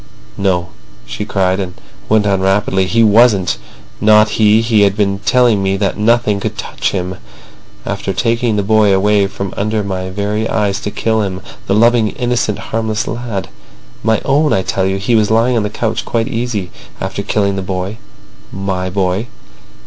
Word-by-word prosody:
"No," 90 -3 0 0.4
she 105 - -5
cried, 95 -2 0
and 90 -2 -4 0.3
went 110 -1 +3
on 100 -2 +1
rapidly. 95 -1 +1
"He 115 +4 +3
wasn't. 105 -3 +4 0.4
Not 105 0 +5
he. 110 0 +3
He 115 -2 +3
had 100 0 +3
been 100 -2 +1
telling 120 0 +3
me 95 0 0
that - - -1
nothing 110 -1 +2
could - - -4
touch - - -2
him. 90 -1 -3 0.7
After - - -3
taking 115 +1 0
the 100 - 0
boy 105 0 +3
away 100 +1 +3
from 100 -1 -6
under 105 +1 -1
my 95 -2 -4
very 105 +3 -2
eyes 100 -2 0
to 105 - -4
kill 110 +1 0
him—the 95 0 -4
loving, 115 0 +4
innocent, 120 -4 -1 0.2
harmless 110 -1 -1
lad. 115 -5 -4 0.5
My 110 0 +2
own, 150 +2 +2
I 95 - +1
tell 95 0 0
you. 95 0 -1
He 100 +5 -1
was 110 -2 +3
lying 115 +3 +2
on 115 - +2
the 105 - -2
couch 110 +1 -2
quite 115 -1 -1
easy—after 115 -5 -5
killing 100 -2 0
the 95 - -2
boy—my 95 0 -6
boy. 95 +3 -1
105 Hz, 165 wpm, -15 LUFS, 95-110 Hz, 0.7 s, Not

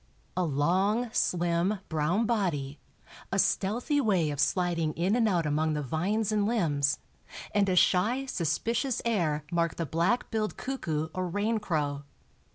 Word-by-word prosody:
A 185 - 0
long, 185 - +1
slim, 175 +3 +1
brown 165 +8 +1
body, 165 - -1 0.5
a - - 0
stealthy 240 +9 +1
way 185 - +2
of 145 - -5
sliding 165 0 +1
in 185 +6 +1
and 230 -3 +3
out 175 -4 +1
among 155 +1 +1
the 150 -1 -2
vines 195 - -1
and 210 -1 +1
limbs, 150 -11 +1 0.6
and 200 -1 +2
a 185 - +2
shy, 220 +9 +3
suspicious 230 - -1
air 165 -10 0
mark 170 -1 0
the 165 - -2
black 170 - 0
billed 215 -2 -2
cuckoo 160 - -3
or 185 -1 -2
raincrow. 175 -8 -1
180 Hz, 145 wpm, -29 LUFS, 155-215 Hz, 0.6 s, and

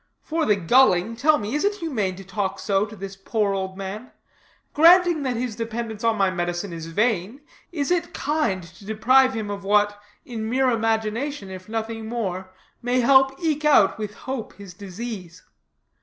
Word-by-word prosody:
For 320 0 -1
the 210 - +4
gulling, 200 +1 +3
tell 300 +5 +3
me, 210 -2 -4
is 295 - 0
it 405 +1 +1
humane 240 - -2
to 195 - -10
talk 195 0 -3
so 200 +1 0
to 220 - -11
this 195 -1 -7
poor 200 +1 -1
old 190 -1 -4
man? 200 +5 -6 0.6
Granting 345 0 +6
that 260 -3 -1
his 240 -2 -3
dependence 230 -1 -5
on 230 -1 +2
my 195 -2 +2
medicine 175 +1 -3
is 165 -1 -7
vain, 210 - -1 0.3
is 295 -2 -2
it 355 -2 0
kind 285 - -1
to 170 +4 -15
deprive 255 +5 +3
him 215 -2 -3
of 200 -1 -6
what, 205 +1 +2 0.2
in 220 -2 -5
mere 255 +1 +2
imagination, 225 +1 -1
if 185 +1 -10
nothing 225 0 -4
more, 190 -6 -3 0.3
may 245 +1 +1
help 265 +2 +4
eke 305 -2 0
out, 280 -10 +4
with 210 -1 -5
hope, 260 -4 -6
his 200 -3 -12
disease? 195 -2 -8
220 Hz, 175 wpm, -23 LUFS, 195-260 Hz, 0.6 s, Granting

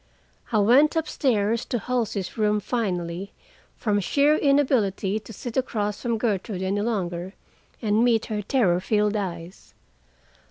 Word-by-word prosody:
I 220 - +2
went 260 +10 +5
up 320 - 0
stairs 230 -4 +1
to 245 - -2
Halsey's 225 -5 -2
room 210 -1 +2
finally, 190 -5 -3 0.4
from 210 -3 0
sheer 285 +9 +3
inability 245 -9 +2
to 220 - -13
sit 230 +3 -6
across 210 -5 -1
from 235 -2 -1
Gertrude 205 -3 -2
any 195 +2 0
longer, 190 -4 -3 0.5
and 215 +1 +2
meet 230 -2 +3
her 215 -2 -3
terror 195 -5 +2
filled 210 +2 +1
eyes. 175 -3 -6
210 Hz, 135 wpm, -24 LUFS, 195-240 Hz, 0.5 s, went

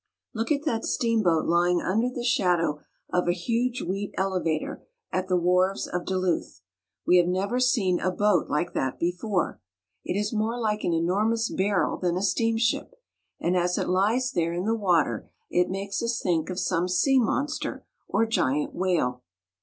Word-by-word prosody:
Look 225 +4 -2
at 295 +1 0
that 230 -7 0
steamboat 215 -9 +1
lying 175 +1 +3
under 225 +9 0
the 250 -1 -5
shadow 175 -10 +1 0.3
of 180 0 +1
a 175 - +3
huge 235 +7 -1
wheat 195 +3 -4
elevator 180 -5 -1 0.3
at 185 0 -1
the 185 -1 +2
wharves 180 +2 +2
of 180 0 -4
Duluth! 185 - -1 0.4
We 180 - +5
have 175 -1 +4
never 195 +7 0
seen 225 -8 +2
a 185 - 0
boat 205 +3 +1
Hke 150 +4 -1
that 130 -1 -1
before. 180 +2 -1 0.4
It 195 - -1
is 210 +2 -2
more 225 +2 -1
like 215 -2 -1
an - - +1
enormous 210 +7 +1
barrel 195 0 +1
than 175 -1 0
a 185 - -2
steamship, 230 - 0 0.4
and 175 +2 0
as 180 0 +1
it - - -1
lies 220 +8 +2
there 170 -1 0
in 175 +2 -2
the 225 - +2
water 175 - +1 0.2
it 180 0 +2
makes 195 +1 -3
us 235 0 -1
think 165 -3 0
of 185 - -4
some 180 -1 0
sea 260 +10 +3
monster 280 +5 -2 0.2
or 225 - +2
giant 150 - 0
whale. 165 -9 0
185 Hz, 170 wpm, -26 LUFS, 175-225 Hz, 0.4 s, We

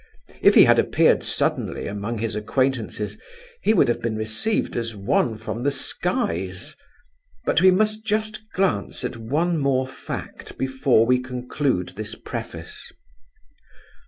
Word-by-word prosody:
If - - +6
he - - +10
had - - +5
appeared - - +3
suddenly - - -1
among 105 +3 -4
his 110 0 -2
acquaintances, 110 -2 -1 0.4
he - - +3
would 215 - +4
have 120 - 0
been 115 -2 -1
received 110 - 0
as 115 -2 -3
one 110 +2 +1
from 110 +1 -5
the 140 - +2
skies; 95 -8 -2 0.7
but - - +3
we 190 - +7
must 215 +3 +2
just 215 0 -1
glance 155 - -1
at 125 - -3
one 155 +9 0
more 135 -2 +1
fact 130 - -8
before 130 -3 +2
we 125 +1 +3
conclude 125 -5 -2
this 110 +3 -6
preface. - - -8
125 Hz, 135 wpm, -23 LUFS, 110-145 Hz, 0.7 s, he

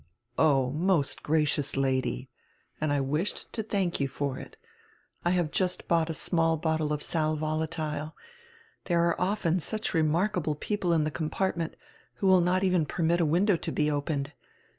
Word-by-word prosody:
"Oh, 135 -5 +3
most 165 -1 +1
gracious 150 -2 +1
Lady." 130 - 0 0.5
"And 155 -1 +1
I 145 - +2
wished 150 +8 -2
to 225 - -2
thank 195 -5 -1
you 140 - +1
for 135 0 -3
it. - - -11 0.7
I 175 - +2
have 175 -4 +1
just 180 +1 -1
bought 165 -1 +2
a - - -1
small 165 0 +1
bottle 160 -1 0
of 150 -1 -2
sal 155 -1 0
volatile. 155 0 -2 0.7
There 170 -1 +2
are 170 - -1
often 185 -2 +1
such 215 +6 -2
remark 165 +6 +2
able 155 -3 -1
people 190 +2 -1
in 160 -2 +3
the 155 - -1
compartment, 165 +1 -2 0.4
who - - -3
will 190 -1 +6
not 180 +2 +2
even 180 -5 +2
permit 170 +2 +1
a - - +3
window 180 +5 +3
to - - -4
be 150 -1 +1
opened. 145 -1 -2
160 Hz, 170 wpm, -28 LUFS, 150-180 Hz, 0.7 s, will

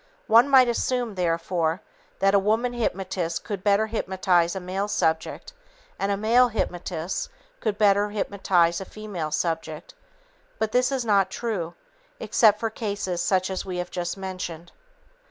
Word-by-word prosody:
One 230 +5 +6
might 260 -2 +7
assume, 240 -1 -1
therefore, 170 -1 0 0.4
that 195 0 +3
a 200 - +6
woman 220 +5 +1
hypnotist 190 -7 -2
could 200 -3 -5
better 205 +1 +3
hypnotize 185 -5 +1
a - - -2
male 190 +2 -3
subject, 160 - -1 0.5
and 200 +1 0
a 200 - 0
male 235 +4 +4
hypnotist 180 -5 -3 0.3
could 210 -2 -2
better 205 0 +3
hypnotize 190 -4 +1
a - - -5
female 195 -7 -5
subject, 165 - -3 0.6
but 220 -1 -1
this 250 +3 +2
is 260 -3 -1
not 200 -3 +3
true 190 -6 -3 0.4
except 215 - +4
for 225 -1 -2
cases 200 -5 -3
such 185 0 +1
as 190 - -3
we 185 -2 -5
have 180 0 -4
just 175 +1 -3
mentioned. 185 -3 -6
195 Hz, 150 wpm, -25 LUFS, 180-220 Hz, 0.6 s, might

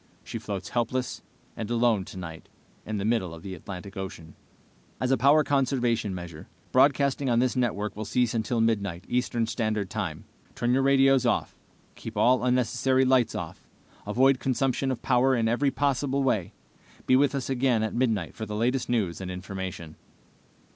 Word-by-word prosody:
She - - -6
floats 95 -3 -5
helpless 125 +1 -2 0.3
and 110 -1 -5
alone 115 -5 +2
tonight 80 -4 -9 0.4
in 110 0 -2
the 100 - -2
middle 100 -7 0
of 80 - -13
the 95 - -6
Atlantic 95 +2 -8
Ocean. 85 -5 -7 0.7
"As 130 0 0
a - - +5
power 145 +4 +5
conservation 125 -7 0
measure, 85 -3 -8 0.2
broadcasting 140 +1 +3
on 120 - +2
this 125 +1 +2
network 105 -5 -1
will 110 - -4
cease 125 +3 +1
until 115 +1 0
midnight, 100 -5 0
eastern 120 -2 0
standard 110 -3 -2
time. 95 -8 -4 0.3
Turn 120 +1 0
your 135 - +3
radios 135 -1 +4
off. - - 0 0.4
Keep - - -9
all 125 0 +4
unnecessary 125 +1 +2
lights 130 -3 +3
off. - - -7 0.4
Avoid 130 +5 +3
consumption 135 0 0
of 130 -3 -3
power 130 +1 +3
in 115 -2 +1
every 125 +5 +2
possible 140 0 0
way. 110 -9 0 0.5
Be 130 - +4
with 140 +1 +3
us 135 -2 -3
again 125 -4 +1
at 110 - -2
midnight 110 -8 0
for 110 - -6
the 105 - -4
latest 125 +4 0
news 100 -8 0
and 95 - -5
information." 90 -3 -6
120 Hz, 170 wpm, -27 LUFS, 100-130 Hz, 0.7 s, a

